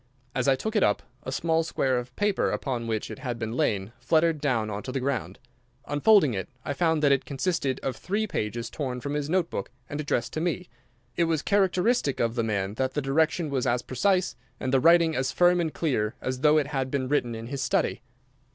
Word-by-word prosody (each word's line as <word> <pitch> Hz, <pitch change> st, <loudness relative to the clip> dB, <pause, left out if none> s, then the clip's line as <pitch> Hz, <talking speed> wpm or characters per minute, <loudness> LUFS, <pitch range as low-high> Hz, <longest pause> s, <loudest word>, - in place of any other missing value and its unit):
As 130 Hz, 0 st, 0 dB
I 135 Hz, -, +5 dB
took 220 Hz, -, -4 dB
it 210 Hz, -, +4 dB
up 105 Hz, -, +2 dB, 0.2 s
a 130 Hz, -, -5 dB
small 160 Hz, +4 st, +1 dB
square 130 Hz, -5 st, 0 dB
of 125 Hz, 0 st, -9 dB
paper 205 Hz, -1 st, +1 dB
upon 120 Hz, -4 st, -2 dB
which 110 Hz, -2 st, -2 dB
it -, -, -8 dB
had 120 Hz, -3 st, -4 dB
lain 110 Hz, -3 st, -1 dB
fluttered 160 Hz, -2 st, +2 dB
down 120 Hz, -7 st, +1 dB
on 100 Hz, 0 st, -4 dB
to 130 Hz, -, -6 dB
the 135 Hz, -, -1 dB
ground. 130 Hz, -3 st, -2 dB, 0.5 s
Unfolding 145 Hz, -, +4 dB
it, 95 Hz, -2 st, -4 dB, 0.2 s
I 145 Hz, -, -1 dB
found 160 Hz, +1 st, +1 dB
that 145 Hz, -, +5 dB
it 135 Hz, -1 st, +3 dB
consisted 140 Hz, +1 st, -1 dB
of 135 Hz, -, -2 dB
three 205 Hz, +4 st, -1 dB
pages 115 Hz, -, -3 dB
torn 130 Hz, -5 st, -3 dB
from 140 Hz, +3 st, -4 dB
his 150 Hz, 0 st, -2 dB
note 180 Hz, -1 st, +1 dB
book 100 Hz, -, -4 dB, 0.2 s
and 145 Hz, +1 st, -4 dB
addressed 125 Hz, -4 st, -1 dB
to 155 Hz, -, -2 dB
me. 175 Hz, +1 st, -2 dB, 0.5 s
It 170 Hz, -, +2 dB
was 160 Hz, -3 st, 0 dB
characteristic 195 Hz, -, +2 dB
of 115 Hz, -1 st, +1 dB
the 120 Hz, -, 0 dB
man 100 Hz, -3 st, -1 dB
that 130 Hz, 0 st, -1 dB
the 150 Hz, -, +1 dB
direction 155 Hz, +3 st, +1 dB
was 130 Hz, -2 st, 0 dB
a 120 Hz, 0 st, +3 dB
precise, 185 Hz, +7 st, +1 dB, 0.2 s
and 130 Hz, 0 st, -2 dB
the 135 Hz, -, +5 dB
writing 165 Hz, +2 st, +5 dB
as 130 Hz, 0 st, 0 dB
firm 175 Hz, 0 st, +4 dB
and 160 Hz, -2 st, -1 dB
clear, 120 Hz, -11 st, -1 dB
as 130 Hz, 0 st, -3 dB
though 150 Hz, +2 st, +5 dB
it 150 Hz, -, +2 dB
had 135 Hz, -3 st, -1 dB
been 130 Hz, -1 st, -1 dB
written 125 Hz, -4 st, 0 dB
in 115 Hz, 0 st, -6 dB
his 135 Hz, +2 st, -4 dB
study. 120 Hz, -, 0 dB
140 Hz, 220 wpm, -27 LUFS, 125-165 Hz, 0.5 s, I